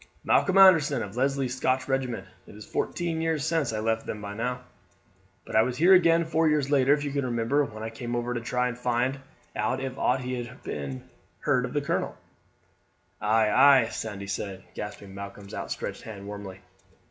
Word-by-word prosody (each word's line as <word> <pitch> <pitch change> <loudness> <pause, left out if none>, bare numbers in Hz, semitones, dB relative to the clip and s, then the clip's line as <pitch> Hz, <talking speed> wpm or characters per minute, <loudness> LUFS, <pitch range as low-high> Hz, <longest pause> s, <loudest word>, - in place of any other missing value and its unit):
"Malcolm 195 0 +3
Anderson, 160 -10 +6
of 100 +1 -8
Leslie's 135 0 0
Scotch 130 0 0
regiment. 130 -7 -1 0.2
It's 105 0 -11
fourteen 170 -2 -2
years 160 -3 0
since 160 -5 +1
I 110 - -2
left 110 0 -1
them 105 - -4
now; 115 +5 -3 0.8
but - - -7
I 110 - +7
was 125 +2 -1
here 175 +6 +6
again 170 -2 +5
four 160 0 +2
years 150 -2 +1
later, 135 -1 +4
if 145 - -5
you 145 - -3
can 140 0 -1
remember, 120 +4 +1
when 110 -2 -8
I 110 - -4
came 120 +1 -5
over 120 0 -1
to 120 - -3
try 125 +2 0
and 125 - -4
find 125 +2 0 0.4
out 110 +5 0
if 135 0 -5
aught 130 +1 +2
had 125 0 -5
been 70 -3 -5 0.3
heard - - +2
of - - -7
the - - +1
colonel." - - -2 1.0
"Ay, 110 +1 +3
ay," 135 -3 +6
Sandy 100 -3 -5
said, 95 0 -5
grasping 105 -1 -7
Malcolm's 100 0 -9
outstretched - - -5
hand 100 -3 -9
warmly. 100 -2 -8
125 Hz, 180 wpm, -27 LUFS, 110-140 Hz, 1.0 s, I